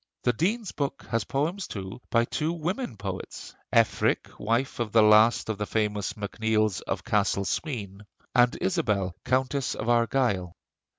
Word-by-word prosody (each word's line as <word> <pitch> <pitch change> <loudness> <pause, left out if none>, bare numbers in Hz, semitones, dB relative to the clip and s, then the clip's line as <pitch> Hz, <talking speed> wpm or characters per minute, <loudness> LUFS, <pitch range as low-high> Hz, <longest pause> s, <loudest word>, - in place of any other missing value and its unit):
The 125 - +3
Dean's 205 - -1
book 140 -1 -3
has 115 0 0
poems, 165 +8 -1
too, 100 +4 -7
by 115 0 +3
two 155 +6 -1
woman 170 - -3
poets: 95 -2 -6 0.2
Efric, - - +2
wife 115 +6 0
of 115 -3 -1
the 110 0 +6
last 110 +2 +5
of 110 -2 -3
the 105 - -2
famous 105 -2 -1
MacNeills 110 -1 0
of - - -2
Castle 100 -1 +1
Sween, 105 - -4 0.3
and 120 -1 +4
Isabel, 105 - 0
Countess 130 +1 0
of 115 - -3
Argyle. 115 -6 +1
115 Hz, 145 wpm, -27 LUFS, 105-135 Hz, 0.3 s, the